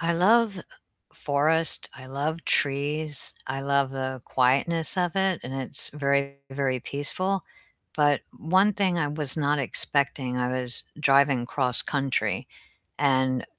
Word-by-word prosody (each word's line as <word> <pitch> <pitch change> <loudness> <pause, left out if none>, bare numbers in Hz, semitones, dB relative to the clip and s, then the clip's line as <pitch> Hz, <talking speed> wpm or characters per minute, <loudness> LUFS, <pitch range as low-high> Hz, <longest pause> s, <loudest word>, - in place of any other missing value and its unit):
I 165 +1 0
love 200 +2 +2 0.5
forest, 155 +3 0
I 130 -1 -11
love 150 +5 -4
trees, 145 +1 +2
I 135 +1 -4
love 140 -1 0
the 130 -1 -5
quietness 140 +8 +2
of 175 -1 -1
it, 190 -2 +1
and 130 - -7
it's 135 -1 0
very, 140 -1 -1
very 135 -1 -2
peaceful, 185 +9 -1 0.5
but 145 -2 +2 0.2
one 190 +6 +2
thing 190 -3 0
I 155 -3 -1
was 150 -1 -3
not 145 -1 0
expecting, 135 -1 -1
I 125 0 -1
was 125 -1 0 0.2
driving 135 -3 +3
cross-country 135 +1 +2 0.5
and 130 -2 +1
140 Hz, 130 wpm, -25 LUFS, 135-160 Hz, 0.5 s, driving